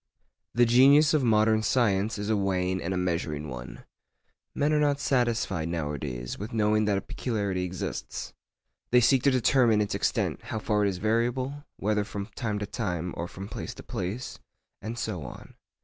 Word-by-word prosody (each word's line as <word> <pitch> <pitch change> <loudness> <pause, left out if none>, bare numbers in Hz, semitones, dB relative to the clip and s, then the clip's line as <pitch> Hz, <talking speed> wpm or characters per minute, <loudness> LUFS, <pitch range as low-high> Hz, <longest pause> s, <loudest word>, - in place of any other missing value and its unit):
The 120 0 +5
genius 140 +6 +6
of 150 -3 +3
modern 110 -1 +4
science 110 -3 +1
is 105 0 -4
a - - +3
weighing 95 -2 0
and 85 - -3
a 95 - -1
measuring 85 -4 -2
one. 65 0 -8 0.7
Men 150 +2 +2
are 150 - +3
not 145 -1 +2
satisfied 115 - 0
nowadays 75 -7 -4
with 105 +3 -6
knowing 110 -1 +2
that 100 -2 +2
a - - -1
peculiarity 100 -4 -2
exists; 90 -8 -5 0.6
they 125 - +6
seek 125 +2 +4
to 140 - +4
determine 125 -3 +3
its 105 -1 0
extent, - - 0
how - - -4
far 105 -1 +1
it - - +3
is 95 - -3
variable—whether 115 0 -1
from 100 -1 -5
time 110 -3 -2
to 105 - -3
time 90 -6 -3
or 85 - -4
from 95 +2 -8
place - - -6
to - - -10
place, 100 +8 -5 0.4
and 115 +3 -5
so 110 -7 -3
on. 65 - -10
105 Hz, 175 wpm, -27 LUFS, 90-120 Hz, 0.7 s, genius